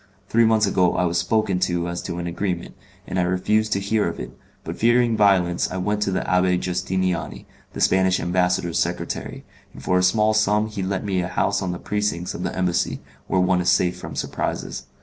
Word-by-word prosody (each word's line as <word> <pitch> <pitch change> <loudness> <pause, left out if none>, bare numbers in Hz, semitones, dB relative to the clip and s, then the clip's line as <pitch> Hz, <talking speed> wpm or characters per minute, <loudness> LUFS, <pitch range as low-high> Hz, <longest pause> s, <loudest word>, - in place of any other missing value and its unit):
Three 115 +1 +4
months 110 -1 +3
ago 90 -2 +2
I 90 - +1
was 85 0 +1
spoken 100 +1 +1
to 85 -1 0
as 85 0 -4
to 85 - -5
an 85 - -4
agreement, 85 0 -3 0.3
and 90 - -2
I - - +3
refused 100 +5 +1
to 100 - 0
hear 105 +2 0
of - - -5
it, 60 +1 -7 0.3
but - - -5
fearing 120 0 +3
violence 95 -5 +3
I 95 - -4
went 105 +3 -1
to 100 - +1
the 95 - 0
Abbé 90 -1 +2
Justiniani, 90 0 -2 0.3
the - - -5
Spanish 95 0 +3
ambassador's 90 -1 0
secretary, 90 +1 -3 0.3
and - - -11
for 90 0 +2
a - - +2
small 105 +4 +3
sum 105 0 +2
he 105 -2 -5
let 95 +1 -2
me 95 -3 0
a 90 - -2
house 100 +3 0
in 95 -2 -2
the 90 - -4
precincts 105 -3 -2
of - - -6
the - - -3
Embassy, 90 0 0 0.3
where 95 - +2
one 90 0 +2
is 90 - +1
safe 90 0 +2
from 90 - -8
surprises. - - -3
95 Hz, 210 wpm, -22 LUFS, 90-105 Hz, 0.3 s, Three